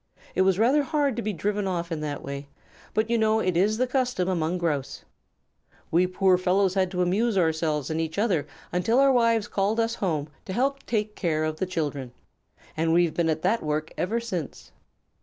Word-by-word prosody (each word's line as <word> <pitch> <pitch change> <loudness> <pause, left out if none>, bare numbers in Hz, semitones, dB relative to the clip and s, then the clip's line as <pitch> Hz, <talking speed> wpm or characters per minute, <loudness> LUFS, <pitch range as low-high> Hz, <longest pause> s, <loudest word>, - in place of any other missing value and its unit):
It - - +1
was 190 -1 +3
rather 255 +8 +4
hard 285 -3 0
to 235 - -2
be 215 - -2
driven 205 +3 -1
off 170 -2 -2
in 160 - -2
that 150 -2 -4
way, 140 +1 -6 0.5
but 215 +1 +2
you 235 - +2
know 220 0 +3
it 185 -5 0
is 205 +5 +2
the 255 - +2
custom 250 -7 0
among 175 -1 0
Grouse. 155 -6 -2 0.9
We 175 +3 +3
poor 185 0 +3
fellows 185 +1 +2
had 190 -1 +1
to 180 -1 0
amuse 205 +4 +1
ourselves 160 -4 0
and 160 +1 0
each 160 +1 -4
other 185 -9 +1 0.2
until 180 +7 +1
our 275 0 +6
wives 230 -3 +3
called 205 +3 0
us 230 0 +1
home 160 -10 -1 0.2
to 190 - -5
help 275 +5 0
take 210 -2 -1
care 155 -4 0
of 155 0 -2
the 190 - -2
children. 145 -8 -3 0.6
We've 165 +1 +2
been 170 -2 +1
at 155 0 -1
that 215 +6 +2
work 155 +1 -2
ever 215 +6 -1
since." 185 - -6
185 Hz, 195 wpm, -26 LUFS, 160-220 Hz, 0.9 s, our